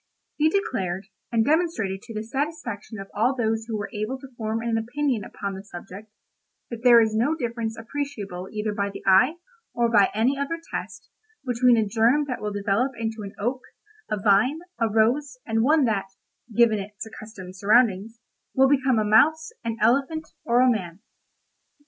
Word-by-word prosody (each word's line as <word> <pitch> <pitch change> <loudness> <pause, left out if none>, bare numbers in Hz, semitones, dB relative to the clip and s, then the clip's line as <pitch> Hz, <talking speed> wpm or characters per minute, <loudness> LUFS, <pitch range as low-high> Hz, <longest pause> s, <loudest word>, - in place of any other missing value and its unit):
He 310 +1 +4
declared, 195 - -2 0.2
and 225 -2 +2
demonstrated 290 - 0
to 230 - -10
the 215 - -3
satisfaction 240 -4 -4
of 195 0 -9
all 235 +6 +1
those 225 -2 -1
who 225 -2 -2
were 205 -1 -5
able 215 +5 -3
to 265 0 -13
form 220 -1 -2
an 230 -1 0
opinion 245 0 -1
upon 200 +1 -5
the 190 0 -8
subject, 195 +2 -10 0.6
that 235 -1 -6
there 240 -2 +8
is 220 -1 +2
no 260 +8 +2
difference 235 -5 -3
appreciable 225 -7 -5
either 215 0 -2
by 200 -1 -1
the 200 - -9
eye, 215 - +5 0.4
or 235 -1 +2
by 205 -4 +5
any 245 +6 +1
other 330 +4 -2
test, - - -6 0.3
between 245 -1 +4
a 220 - +2
germ 235 +8 +2
that 255 - -4
will 210 0 -2
develop 205 +6 0
into 225 -1 -3
an 200 -1 -8
oak, 245 +5 -2 0.5
a 215 -1 -1
vine, 215 - +3 0.2
a 230 -1 +2
rose, 250 +6 +1
and 225 0 0
one 295 +3 +4
that 210 -4 0 0.4
(given 225 -1 +4
its 205 +2 -7
accustomed 215 -4 -10
surroundings) 215 +1 +2 0.4
will 265 0 +5
become 265 -3 +2
a 215 - +1
mouse, 315 +10 +4
an 230 -1 -3
elephant, 275 +8 +1 0.2
or 240 +1 +3
a 255 0 +5
man. 185 -4 -4
225 Hz, 175 wpm, -25 LUFS, 210-260 Hz, 0.6 s, there